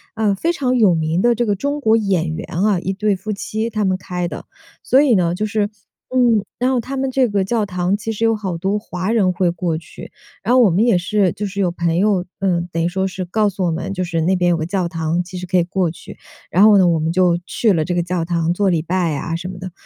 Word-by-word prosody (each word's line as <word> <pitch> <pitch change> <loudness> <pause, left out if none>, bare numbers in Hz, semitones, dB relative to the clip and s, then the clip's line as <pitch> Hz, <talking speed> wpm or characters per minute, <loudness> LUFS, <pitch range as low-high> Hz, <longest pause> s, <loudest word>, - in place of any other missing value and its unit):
呃， 215 -3 +1
非 330 - 0
常 255 -5 0
有 205 -7 +5
名 160 +2 0
的 240 0 +4
这 240 +1 -1
个 205 - +1
中 285 +9 -2
国 225 -2 +4
演 175 -7 0
员 - - -6
啊， 190 +2 +2
一 190 +2 -3
对 205 +1 0
夫 205 +3 -5
妻 220 +3 -3
他 215 -2 -2
们 185 0 +1
开 180 -1 -4
的。 - - -8 0.4
所 265 - +4
以 275 -6 +4
呢 175 -3 +1
就 210 - -3
是 210 0 0 0.5
嗯， 230 -5 +3
然 250 +1 +2
后 260 - +1
他 265 +4 -5
们 265 0 -1
这 260 -1 +2
个 205 -3 0
教 220 +2 0
堂 180 0 -1
其 225 +1 -4
实 225 +1 -4
有 225 -1 +3
好 190 -4 -4
多 195 +3 0
华 190 -1 -4
人 195 -6 +2
会 180 -1 +1
过 170 -1 -2
去， 165 - -12 0.3
然 235 - +1
后 255 - +6
我 215 - +5
们 195 +7 +2
也 205 -7 +3
是 195 -1 +1
就 205 0 -4
是 200 +1 -6
有 180 -3 +1
朋 170 -1 -1
友， 195 -2 +2
呃， 185 -3 0
等 165 0 -1
于 - - +2
说 190 +2 -1
是 185 -1 -5
告 210 +3 +1
诉 190 0 -4
我 175 - +1
们， 165 +4 -4
就 185 -2 -2
是 165 -2 -2
那 185 +4 +2
边 175 -1 +2
有 - - +3
个 160 - -3
教 185 -1 -1
堂 165 +1 -1
其 180 +1 -11
实 180 - -7
可 185 0 +1
以 175 - +4
过 180 0 -1
去。 160 - -11 0.4
然 185 - +4
后 210 -1 +7
呢， 185 -2 +5
我 165 -2 +2
们 160 +1 -1
就 175 -1 +2
去 220 -4 +1
了 160 -2 +1
这 175 +2 -2
个 175 - +1
教 175 -1 -2
堂， 170 -1 0
做 195 +1 +1
礼 165 -3 0
拜 170 -3 0
啊 165 +4 -3
什 175 +2 -5
么 185 0 -7
的。 185 0 -7
185 Hz, 295 characters per minute, -19 LUFS, 175-215 Hz, 0.5 s, 后